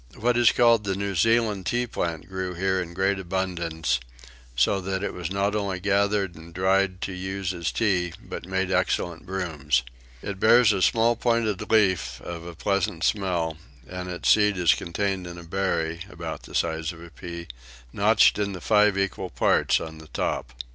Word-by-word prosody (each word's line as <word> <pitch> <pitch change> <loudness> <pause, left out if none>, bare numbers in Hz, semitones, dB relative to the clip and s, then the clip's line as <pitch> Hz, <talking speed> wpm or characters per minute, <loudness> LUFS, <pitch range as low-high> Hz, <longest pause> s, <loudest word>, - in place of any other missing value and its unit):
What 120 +2 +1
is 120 -1 +5
called 115 -3 +4
the 95 -2 -1
New 100 0 -2
Zealand 110 0 +2
tea 120 +1 +1
plant 85 -8 -3
grew 95 -1 -4
here 95 +1 0
in 85 -1 -7
great 95 +1 +1
abundance; 85 -7 -1 0.6
so 80 +11 +2
that 95 +1 -3
it - - -2
was 90 -2 -4
not 100 +2 0
only 100 -3 -2
gathered 100 -1 +1
and 85 +1 -13
dried 95 0 +1
to - - -3
use 95 +1 -3
as 85 -5 -2
tea 90 - 0
but - - -8
made 95 0 -1
excellent 85 -1 0
brooms. 75 -9 -1 0.4
It 100 -1 -5
bears 115 0 +6
a 95 - -1
small 115 +4 +3
pointed 115 -4 0
leaf 100 -5 +2
of 85 -1 -7
a 85 - -8
pleasant 100 -1 -1
smell, 90 -6 0 0.3
and 90 0 -6
its 90 -1 -4
seed 105 -2 +4
is 85 -3 +5
contained 95 +1 -2
in 85 0 -8
a 85 - -9
berry, 85 -2 -1
about 85 -4 -6
the - - -11
size 80 +1 0
of 85 -1 -12
a 85 - -12
pea, 85 0 -8 0.5
notched - - +4
into 100 -3 -2
five 105 +1 +3
equal 95 -1 -2
parts 65 - +2
on 80 -1 -8
the 80 - -13
top. - - -2
95 Hz, 180 wpm, -25 LUFS, 85-100 Hz, 0.6 s, bears